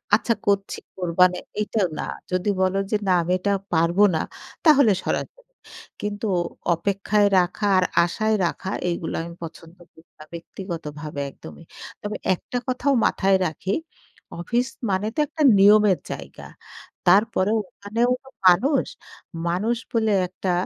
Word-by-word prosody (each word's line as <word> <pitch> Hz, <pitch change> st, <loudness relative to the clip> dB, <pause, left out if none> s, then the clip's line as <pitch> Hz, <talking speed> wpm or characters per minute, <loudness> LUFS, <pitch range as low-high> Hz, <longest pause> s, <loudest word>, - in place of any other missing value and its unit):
"আচ্ছা 230 Hz, +2 st, +1 dB
করছি, 200 Hz, -1 st, 0 dB, 0.2 s
কোরবানে," 180 Hz, 0 st, +2 dB, 0.2 s
এইটা 210 Hz, 0 st, -1 dB, 0.2 s
না। -, -, -2 dB, 0.3 s
যদি 185 Hz, +3 st, 0 dB
বলো 185 Hz, +1 st, +1 dB
যে -, -, +2 dB
"না, -, -, +3 dB
আমি 175 Hz, +2 st, -3 dB
এটা 200 Hz, +2 st, 0 dB, 0.2 s
পারবো 170 Hz, +5 st, +3 dB
না।" 160 Hz, -, +1 dB, 0.4 s
তাহলে 280 Hz, -8 st, +6 dB
সরাসরি। -, -, -3 dB, 0.6 s
কিন্তু 210 Hz, +1 st, -3 dB, 0.5 s
অপেক্ষায় 200 Hz, +3 st, +1 dB
রাখা 185 Hz, +4 st, -1 dB
আর 185 Hz, -, +3 dB, 0.2 s
আশায় 215 Hz, +5 st, 0 dB
রাখা, 185 Hz, +2 st, -3 dB, 0.2 s
এগুলা 170 Hz, -1 st, -3 dB
আমি 170 Hz, 0 st, -9 dB
পছন্দ 165 Hz, +1 st, -10 dB
করি 160 Hz, +1 st, -22 dB
না -, -, -10 dB
ব্যক্তিগতভাবে 160 Hz, -4 st, -7 dB
একদমই। 75 Hz, -2 st, -13 dB, 0.4 s
তবে 210 Hz, 0 st, -4 dB, 0.2 s
একটা 245 Hz, -, -6 dB
কথাও 255 Hz, +2 st, +1 dB
মাথায় 195 Hz, 0 st, +3 dB
রাখি, 180 Hz, +5 st, -4 dB, 0.7 s
অফিস 240 Hz, +8 st, 0 dB, 0.2 s
মানে 195 Hz, +2 st, 0 dB
তো -, -, -2 dB
একটা 310 Hz, +2 st, -2 dB, 0.2 s
নিয়মের 205 Hz, -1 st, +6 dB
জায়গা। -, -, -8 dB, 0.6 s
তারপরেও 205 Hz, +2 st, +3 dB
ওখানেও 225 Hz, +4 st, -1 dB
তো 265 Hz, -, -15 dB, 0.2 s
মানুষ। 250 Hz, -, +4 dB, 0.6 s
মানুষ 210 Hz, +7 st, 0 dB, 0.2 s
বলে 220 Hz, -2 st, +2 dB, 0.2 s
একটা 185 Hz, +1 st, -3 dB
195 Hz, 135 wpm, -23 LUFS, 175-215 Hz, 0.7 s, তাহলে